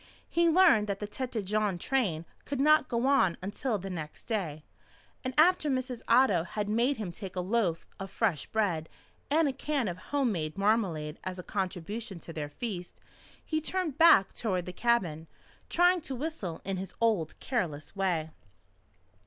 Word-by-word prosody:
He 340 0 +3
learned 325 - +5
that 200 -1 -2
the 210 - -3
Tête 235 0 -4
Jaune 210 -1 0
train 175 -7 0 0.2
could 280 -2 -4
not 305 0 +5
go 235 +1 0
on 230 -11 +3
until 210 +5 -2
the 195 0 -6
next 155 -4 -6
day, 170 -10 -3 0.6
and 255 - -2
after 320 -1 +5
Mrs. 255 -2 -2
Otto 230 -7 +5
had 205 +4 -4
made 235 +6 +2
him 205 -5 -4
take 190 +1 -7
a - - -1
loaf 180 -3 0
of 195 0 -5
fresh 190 -7 0
bread 180 -8 0 0.4
and 310 +2 +3
a 275 - -1
can 280 -4 -1
of 175 -1 -3
home 275 -4 +1
made 155 -2 -3
marmalade 190 -8 0
as 185 0 -4
a 180 - -6
contribution 195 +3 -4
to 165 - -8
their 150 -2 -4
feast, 180 +2 -6 0.5
he 315 -1 -1
turned 325 -3 -2
back 320 - +7
toward 185 -6 -1
the 180 - -6
cabin, 180 -9 0 0.4
trying 355 0 +4
to 270 -3 -5
whistle 250 - -4
in 195 0 -2
his 190 +1 -6
old 215 -9 +1
careless 175 - -3
way. 175 -5 0
210 Hz, 170 wpm, -30 LUFS, 180-260 Hz, 0.6 s, back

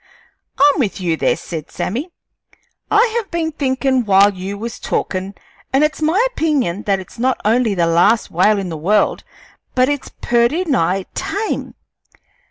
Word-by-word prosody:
"I'm 285 +1 +4
with 215 -8 -1
you 175 -3 0
there," - - +1
said 160 -2 -7
Sammy. 260 - -3 0.8
"I 430 +2 +5
have 450 -4 -3
been 330 -2 -2
thinkin' 265 -3 0
while 200 -1 +5
you 190 +2 -6
was 230 +3 -6
talkin', 190 +1 -3 0.4
an' 270 +3 +3
it's 305 +1 0
my 320 +6 +2
opinion 280 - 0
that 195 -1 +2
it's 190 +4 -12
not 255 +2 +1
only 225 -1 +2
the 170 -2 +2
last 175 +7 +3
whale 205 +5 +3
in 195 -2 -3
the 160 - -5
world, 200 +7 +1 0.5
but 255 +1 +3
it's 290 -2 -3
purty 240 +9 +2
nigh 195 - +1
tame. 400 +3 -3
235 Hz, 160 wpm, -18 LUFS, 190-290 Hz, 0.8 s, I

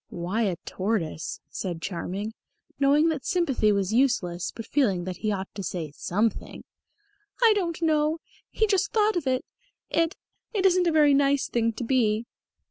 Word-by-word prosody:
"Why 180 +6 -2
a 195 -6 +1
tortoise?" 185 -6 -2
said 175 -4 -4
Charming, 195 +4 -4 0.5
knowing 290 +3 +4
that 300 -5 -2
sympathy 280 - +2
was 200 0 0
useless, 210 -9 +1
but 225 - -8
feeling 210 -11 +1
that 185 0 -5
he 215 - -1
ought 195 -1 -4
to 200 - -6
say 170 -5 -4
something. 215 +5 -2 0.8
"I 450 -2 +7
don't 345 -5 -1
know. 310 0 +2 0.3
He 440 - +1
just 405 -1 +1
thought 430 -1 +3
of 330 -6 -1
it. 255 -1 0 0.5
It 330 +2 +1 0.4
it 390 -2 +1
isn't 365 -1 +4
a - - +3
very 300 -2 +5
nice 280 0 +3
thing 230 -1 +1
to 230 - -5
be." 230 -3 +1
245 Hz, 165 wpm, -26 LUFS, 195-315 Hz, 0.8 s, I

